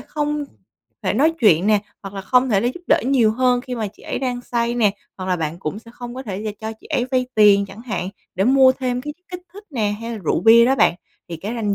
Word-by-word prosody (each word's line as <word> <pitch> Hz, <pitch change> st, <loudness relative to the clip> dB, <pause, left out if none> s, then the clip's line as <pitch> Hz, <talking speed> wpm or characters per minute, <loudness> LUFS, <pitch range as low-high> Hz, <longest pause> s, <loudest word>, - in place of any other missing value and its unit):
không 295 Hz, -1 st, -3 dB, 0.6 s
thể -, -, 0 dB
nói 295 Hz, +9 st, +3 dB
chuyện 190 Hz, -5 st, +4 dB
nè 215 Hz, -1 st, +4 dB, 0.2 s
hoặc 195 Hz, 0 st, -8 dB
là 195 Hz, -, -4 dB
không 250 Hz, +7 st, +2 dB
thể 200 Hz, -3 st, +3 dB
là 235 Hz, -, 0 dB
giúp 355 Hz, -, -9 dB
đỡ -, -, +4 dB
nhiều 250 Hz, -5 st, +3 dB
hơn 250 Hz, +1 st, +2 dB
khi 250 Hz, 0 st, -6 dB
mà 225 Hz, -3 st, -2 dB
chị 200 Hz, -, -20 dB
ấy -, -, -4 dB
đang 250 Hz, -2 st, -2 dB
say 235 Hz, -1 st, -1 dB
nè. 225 Hz, -4 st, +3 dB, 0.3 s
Hoặc 185 Hz, -, -6 dB
là 180 Hz, -, +1 dB
bạn 160 Hz, 0 st, -3 dB
cũng 185 Hz, +2 st, -4 dB
sẽ 230 Hz, +1 st, -15 dB
không 245 Hz, -1 st, -8 dB
có 260 Hz, -, -6 dB
thể 200 Hz, -4 st, -5 dB
và 215 Hz, -, -2 dB
cho 220 Hz, 0 st, -4 dB
chị -, -, -15 dB
ấy 245 Hz, -, 0 dB
vay 255 Hz, -1 st, +1 dB
tiền 200 Hz, -2 st, +5 dB
chẳng 200 Hz, +2 st, -12 dB
hạn 210 Hz, -6 st, -3 dB, 0.3 s
để 190 Hz, -, +1 dB
mua 260 Hz, +1 st, +6 dB
thêm 250 Hz, -1 st, -2 dB
cái 295 Hz, +2 st, -5 dB
chất 360 Hz, +3 st, -46 dB
kích 360 Hz, 0 st, -6 dB
thích 405 Hz, +2 st, -12 dB
nè, 215 Hz, -7 st, -1 dB
hay 230 Hz, +1 st, -5 dB
là 220 Hz, -, -5 dB
rượu 155 Hz, -, +1 dB
bia 225 Hz, +4 st, +7 dB
đó 260 Hz, +3 st, +3 dB
bạn. 235 Hz, -, +3 dB, 0.3 s
Thì 170 Hz, -, -5 dB
cái 205 Hz, +8 st, -5 dB
ranh 210 Hz, -4 st, -1 dB
235 Hz, 275 wpm, -21 LUFS, 205-255 Hz, 0.6 s, bia